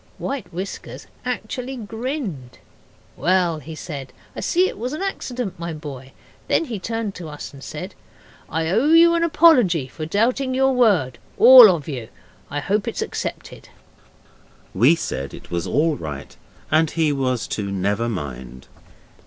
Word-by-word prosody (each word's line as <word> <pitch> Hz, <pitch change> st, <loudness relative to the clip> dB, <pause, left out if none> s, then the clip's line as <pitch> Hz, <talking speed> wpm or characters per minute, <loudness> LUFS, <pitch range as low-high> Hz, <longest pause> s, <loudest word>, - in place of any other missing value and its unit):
White 270 Hz, -9 st, -5 dB
Whiskers 185 Hz, +4 st, -7 dB, 0.2 s
actually 250 Hz, +2 st, -4 dB
grinned. 225 Hz, -, -5 dB, 0.6 s
'Well,' 175 Hz, -3 st, +1 dB
he 155 Hz, +2 st, -9 dB
said, 145 Hz, -5 st, -7 dB, 0.2 s
'I -, -, -5 dB
see 365 Hz, +2 st, +2 dB
it -, -, -7 dB
was 250 Hz, +5 st, -3 dB
an 310 Hz, -, -4 dB
accident, 250 Hz, -, -4 dB
my 170 Hz, -1 st, -4 dB
boy.' 140 Hz, -4 st, -9 dB, 0.4 s
Then -, -, +2 dB
he 230 Hz, -8 st, -5 dB
turned 225 Hz, 0 st, -3 dB
to 170 Hz, -4 st, -8 dB
us 150 Hz, -1 st, -8 dB
and 135 Hz, -1 st, -12 dB
said -, -, -7 dB, 0.6 s
'I 160 Hz, 0 st, -1 dB
owe 230 Hz, +9 st, +2 dB
you 335 Hz, +1 st, +7 dB
an 335 Hz, 0 st, +1 dB
apology 250 Hz, -, +4 dB
for 155 Hz, +3 st, -7 dB
doubting 255 Hz, +8 st, +1 dB
your 265 Hz, 0 st, +3 dB
word 200 Hz, -, +2 dB, 0.2 s
all 245 Hz, -2 st, +10 dB
of 165 Hz, -6 st, -1 dB
you. 125 Hz, -7 st, -5 dB, 0.4 s
I 145 Hz, 0 st, -3 dB
hope 200 Hz, +5 st, -1 dB
it's -, -, -2 dB
accepted.' -, -, -6 dB, 1.0 s
We 140 Hz, +8 st, +5 dB
said 70 Hz, -, -5 dB
it -, -, -14 dB
was 85 Hz, +1 st, -2 dB
all 150 Hz, -, +1 dB
right 75 Hz, -3 st, -7 dB, 0.4 s
and 160 Hz, +1 st, +3 dB
he 155 Hz, -2 st, +1 dB
was 130 Hz, -4 st, -1 dB
to 100 Hz, -2 st, -3 dB
never 100 Hz, +4 st, -1 dB
mind. 65 Hz, -, -7 dB
170 Hz, 155 wpm, -22 LUFS, -, 1.0 s, all